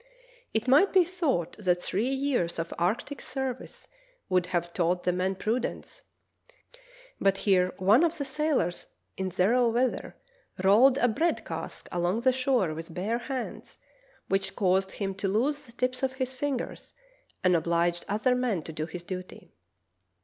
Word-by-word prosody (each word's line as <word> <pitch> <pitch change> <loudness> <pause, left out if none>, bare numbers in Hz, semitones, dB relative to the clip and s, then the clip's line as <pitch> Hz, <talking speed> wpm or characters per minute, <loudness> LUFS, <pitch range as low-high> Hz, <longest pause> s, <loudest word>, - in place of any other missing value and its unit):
It 220 +3 -1
might 295 +10 +5
be 370 -2 +5
thought 295 - -1
that 180 -3 +2
three 205 +7 0
years 265 -11 0
of 165 0 -3
arctic 215 +10 -1
service 265 -2 -5 0.4
would 180 -1 +2
have 175 -1 -2
taught 180 0 +1
the 180 - +2
men 185 +2 0
prudence, 225 +6 -3 1.2
but 195 0 +3
here 185 -3 +3
one 205 - +5
of 340 0 +1
the 285 - -3
sailors 270 - -1 0.3
in 190 -1 -2
zero 230 +7 +3
weather 245 +2 -1 0.5
rolled 240 +8 +6
a 245 - +3
bread 320 +9 0
cask - - -6
along 175 +5 0
the 260 +1 +4
shore 255 - +1
with 165 +1 -7
bare 215 +6 -1
hands, 255 +1 -6 0.5
which 195 0 0
caused 190 0 +1
him 195 -2 -3
to 195 +1 -3
lose 260 +9 0
the - - -14
tips 255 +1 -2
of 265 -1 0
his 260 -1 -3
fingers 270 -1 -4 0.5
and 180 -1 +4
obliged 170 +1 +1
other 215 +5 +2
men 245 -9 0
to 160 - -8
do 155 +1 -3
his 175 +1 -7
duty. 185 0 -8
210 Hz, 155 wpm, -28 LUFS, 180-260 Hz, 1.2 s, rolled